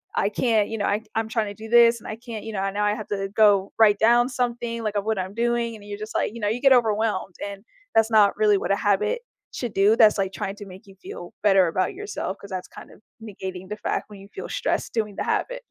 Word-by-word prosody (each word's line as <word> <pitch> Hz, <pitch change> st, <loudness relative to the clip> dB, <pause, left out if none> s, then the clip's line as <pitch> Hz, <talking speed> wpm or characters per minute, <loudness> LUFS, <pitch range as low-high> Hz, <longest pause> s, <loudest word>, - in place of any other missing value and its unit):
I 200 Hz, -, +1 dB
can't" 215 Hz, -1 st, +1 dB
you 225 Hz, -, -4 dB
know 205 Hz, -, -1 dB
"I 205 Hz, -, +1 dB
c 220 Hz, -, -23 dB
I'm 225 Hz, 0 st, 0 dB
trying 220 Hz, -1 st, 0 dB
to 205 Hz, -, -6 dB
do 220 Hz, +2 st, -10 dB
this, 235 Hz, 0 st, +6 dB
and -, -, -11 dB
I 215 Hz, -, -5 dB
can't" 230 Hz, -2 st, -8 dB
you 225 Hz, -, -5 dB
know 200 Hz, -, -2 dB
"and 195 Hz, 0 st, -2 dB
now 210 Hz, +1 st, 0 dB
I 205 Hz, -, +2 dB
have 215 Hz, -1 st, -7 dB
to 195 Hz, -1 st, -2 dB
go 205 Hz, -2 st, +3 dB
write 210 Hz, -2 st, +5 dB
down 240 Hz, +2 st, +4 dB
something, 240 Hz, -2 st, -2 dB
like, 215 Hz, -1 st, -2 dB
of 205 Hz, -, 0 dB
what 220 Hz, -2 st, 0 dB
I'm 185 Hz, +1 st, -4 dB
doing," 235 Hz, 0 st, 0 dB
and 210 Hz, -, -13 dB
you're 205 Hz, 0 st, -6 dB
just 215 Hz, +1 st, -8 dB
like -, -, 0 dB
you 235 Hz, -, -8 dB
know, 205 Hz, -, +1 dB
you 235 Hz, +3 st, -2 dB
get 275 Hz, -1 st, +6 dB
overwhelmed, 215 Hz, -6 st, +1 dB
and 200 Hz, 0 st, -8 dB, 0.3 s
that's 225 Hz, +1 st, +4 dB
not 210 Hz, -2 st, +4 dB
really 210 Hz, -1 st, +4 dB
what 195 Hz, -, -2 dB
a -, -, +4 dB
habit 210 Hz, -, +1 dB, 0.3 s
should 240 Hz, -4 st, -4 dB
do 200 Hz, +3 st, +4 dB
that's, 215 Hz, -2 st, +6 dB
like, 195 Hz, -1 st, -1 dB
trying 195 Hz, 0 st, -4 dB
to 205 Hz, -, -9 dB
make 190 Hz, +1 st, -13 dB
you 195 Hz, -, -15 dB
feel 175 Hz, -, -9 dB
better 195 Hz, -3 st, +5 dB
about 185 Hz, +3 st, -1 dB
yourself 410 Hz, -, -5 dB
'cause 200 Hz, -, -12 dB
that's 185 Hz, -1 st, -5 dB
kinda -, -, -13 dB, 0.3 s
negating 190 Hz, -4 st, -7 dB
the 210 Hz, -, -3 dB
fact -, -, -3 dB
when 205 Hz, -2 st, -11 dB
you 200 Hz, -, -14 dB
feel -, -, -7 dB
stressed -, -, -2 dB
doing 210 Hz, -3 st, -2 dB
the -, -, -1 dB
habit. -, -, -2 dB
210 Hz, 270 wpm, -24 LUFS, 200-225 Hz, 0.3 s, this